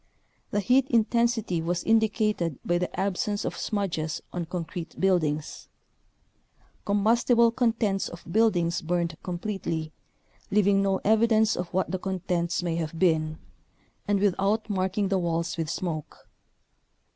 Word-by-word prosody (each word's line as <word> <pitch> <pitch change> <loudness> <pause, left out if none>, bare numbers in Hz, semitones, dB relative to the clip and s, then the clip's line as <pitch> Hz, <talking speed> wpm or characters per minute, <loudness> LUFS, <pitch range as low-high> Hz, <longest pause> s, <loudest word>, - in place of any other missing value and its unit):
The 205 - 0
heat 255 +5 +3
intensity 230 -5 +1
was 170 +2 -1
indicated 215 - +1
by 175 0 +1
the 180 - -3
absence 200 +2 -1
of - - -3
smudges 170 -6 -2
on 175 -1 -3
concrete 175 0 -6
buildings. 155 -6 0 1.2
Combustible 230 +3 +3
contents 225 -5 0
of 170 - -10
buildings 180 -6 +2
burned 170 0 -1
completely, 175 -4 -3 0.6
leav 210 -1 +3
ing 195 0 +4
no 195 -1 +1
evidence 220 0 +3
of 175 -1 -4
what 190 0 0
the 185 - -2
contents 180 -2 -1
may 170 -2 -1
have 165 -1 -4
been, 160 -3 +2 0.7
and 205 -1 +2
without 205 +2 +1
marking 190 +1 0
the 195 -1 +2
walls 170 -1 -1
with 160 -2 -3
smoke. 165 -3 -5
190 Hz, 130 wpm, -27 LUFS, 170-215 Hz, 1.2 s, ing